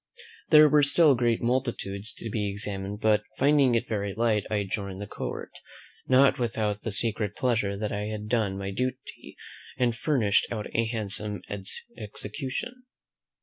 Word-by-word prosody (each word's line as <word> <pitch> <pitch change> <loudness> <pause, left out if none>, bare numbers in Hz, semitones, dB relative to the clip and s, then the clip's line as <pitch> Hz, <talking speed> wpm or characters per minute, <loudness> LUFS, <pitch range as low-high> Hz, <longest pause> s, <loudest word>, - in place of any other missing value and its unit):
There 155 -1 +8
were 150 0 +5
still 145 +1 +5
great 120 -2 +1
multitudes 115 -4 -1
to 115 - -6
be 105 -2 -1
examined; 100 0 -4
but, 110 -1 +3 0.2
finding 140 -4 +4
it 115 +1 0
very 100 -2 -2
late, 110 -2 +1
I 110 - -1
adjourned 100 -1 -3
the 105 - -4
court, - - -6 0.6
not 130 +1 +5
without 110 -3 -1
the - - -3
secret 105 0 -1
pleasure 115 -6 0
that 105 +1 -3
I 105 0 -2
had 105 0 -5
done 105 -4 0
my 100 0 -4
duty, 125 +5 -5 0.4
and 120 -2 +1
furnished 115 -6 +2
out 110 -3 -3
a 115 - +2
handsome 105 -3 -2 0.5
execution. 130 - -6
110 Hz, 150 wpm, -27 LUFS, 105-125 Hz, 0.6 s, There